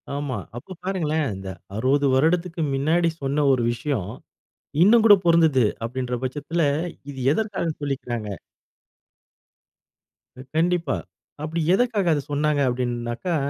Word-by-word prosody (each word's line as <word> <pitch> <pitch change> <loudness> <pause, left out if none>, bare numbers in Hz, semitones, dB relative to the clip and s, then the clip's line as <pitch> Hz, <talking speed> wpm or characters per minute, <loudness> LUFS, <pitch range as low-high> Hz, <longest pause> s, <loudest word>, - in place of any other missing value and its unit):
ஆமா. 145 -3 -3 0.2
அப்போ 155 +10 -10
பாருங்களேன். 160 -5 0
இந்த 95 0 -7 0.3
60 140 +4 +2
வருடத்திற்கு 165 +4 +1
மின்னாடி 165 +5 +2
சொன்ன 140 +2 0
ஒரு 125 - +1
விஷயம். 115 -5 -3 0.7
இன்னும் 225 +3 +6
கூட 205 -2 +9
பொறுந்துது 160 -8 +4 0.2
அப்படிங்கிற 125 +1 -3
பட்சத்தில, 150 +6 -2 0.5
இது 135 - -9
எதற்க்காக 205 -4 -2
சொல்லிர்காங்க. 120 -6 -3 2.3
கண்டிப்பா. 170 -3 +1 0.5
அப்படி 160 +2 -3
எதுக்காக 215 -3 +1
அதை 145 - 0
சொன்னாங்க 145 0 +1
அப்படின்னாக்கா, 120 +6 -2
145 Hz, 105 wpm, -23 LUFS, 130-170 Hz, 2.3 s, கூட